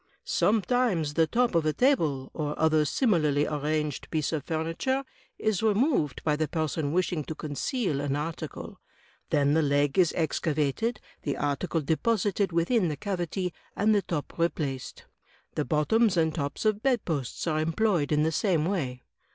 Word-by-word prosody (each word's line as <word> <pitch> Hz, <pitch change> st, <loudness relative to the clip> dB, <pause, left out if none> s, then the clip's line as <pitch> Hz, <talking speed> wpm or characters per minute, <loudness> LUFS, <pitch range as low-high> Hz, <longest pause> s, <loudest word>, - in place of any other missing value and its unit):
"Sometimes 205 Hz, -7 st, +1 dB
the 160 Hz, +1 st, +3 dB
top 245 Hz, +5 st, +1 dB
of 165 Hz, -2 st, +3 dB
a 155 Hz, 0 st, +1 dB
table, 160 Hz, -, +1 dB
or 150 Hz, -2 st, -3 dB
other 155 Hz, -1 st, +3 dB
similarly 155 Hz, -, +2 dB
arranged 150 Hz, -1 st, -2 dB
piece 155 Hz, -2 st, -1 dB
of 150 Hz, -4 st, -1 dB
furniture, 165 Hz, -, -1 dB, 0.3 s
is 215 Hz, -4 st, 0 dB
removed 220 Hz, -, +1 dB
by 150 Hz, -2 st, +2 dB
the 155 Hz, 0 st, -1 dB
person 155 Hz, -1 st, -1 dB
wishing 175 Hz, -2 st, 0 dB
to 160 Hz, -, -5 dB
conceal 155 Hz, -, -2 dB
an 145 Hz, -1 st, -1 dB
article; 155 Hz, +3 st, -5 dB, 0.5 s
then 145 Hz, 0 st, +3 dB
the 160 Hz, -, +4 dB
leg 145 Hz, +2 st, +2 dB
is 175 Hz, -3 st, +5 dB
excavated, 160 Hz, -, 0 dB, 0.2 s
the 145 Hz, -, -2 dB
article 145 Hz, +4 st, -1 dB
deposited 200 Hz, -, +1 dB
within 175 Hz, +5 st, +2 dB
the 150 Hz, -2 st, -3 dB
cavity, 180 Hz, -2 st, -3 dB, 0.2 s
and 215 Hz, +1 st, +3 dB
the 205 Hz, -, +3 dB
top 165 Hz, -6 st, -4 dB
replaced. 145 Hz, -6 st, -2 dB, 0.5 s
The -, -, -1 dB
bottoms 185 Hz, -, +2 dB
and 160 Hz, -1 st, +2 dB
tops 145 Hz, +5 st, -3 dB
of 215 Hz, -1 st, +2 dB
bedposts 175 Hz, -, -1 dB
are 155 Hz, -2 st, 0 dB
employed 165 Hz, -1 st, +1 dB
in 150 Hz, 0 st, +3 dB
the 160 Hz, -, +1 dB
same 160 Hz, -2 st, +1 dB
way." 140 Hz, -10 st, -2 dB
160 Hz, 155 wpm, -28 LUFS, 150-200 Hz, 0.5 s, is